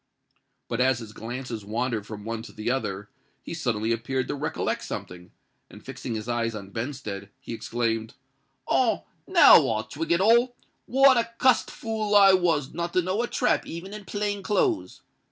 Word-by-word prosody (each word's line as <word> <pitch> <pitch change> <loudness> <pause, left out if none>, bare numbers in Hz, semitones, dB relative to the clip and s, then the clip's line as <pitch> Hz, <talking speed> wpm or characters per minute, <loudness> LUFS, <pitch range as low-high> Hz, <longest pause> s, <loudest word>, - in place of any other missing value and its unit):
But 120 +1 -1
as 130 -1 +3
his 110 -2 -9
glances 120 0 -6
wandered 115 0 -2
from 105 -1 -8
one 115 0 -3
to 115 - -11
another, 105 -3 -3 0.3
he - - -6
suddenly 115 -9 -1
appeared 130 +3 -1
to - - -1
recollect 145 +2 -2
something; 90 0 -7 0.4
and, - - -14
fixing 115 - -5
his 110 +1 -5
eyes 115 -1 -1
on 100 -2 -8
Benstead, 115 -5 -5
he 130 - -7
exclaimed, 115 -1 -2 0.5
"Ah! - - +2 0.2
now - - +7
I 110 -1 -1
twig 165 +7 -5
it 170 - +4
all. 235 +5 +4 0.3
What 270 0 +6
a 230 0 +1
cussed 255 -1 +3
fool 220 -2 -2
I 195 -1 +8
was 170 -7 +1
not 170 +1 -3
to 180 - +2
know 185 +5 0
a 240 - -1
trap 245 - 0
even 175 +5 -7
in 210 -1 -8
plain 205 0 -2
clothes! 310 - 0
130 Hz, 170 wpm, -26 LUFS, -, 0.5 s, I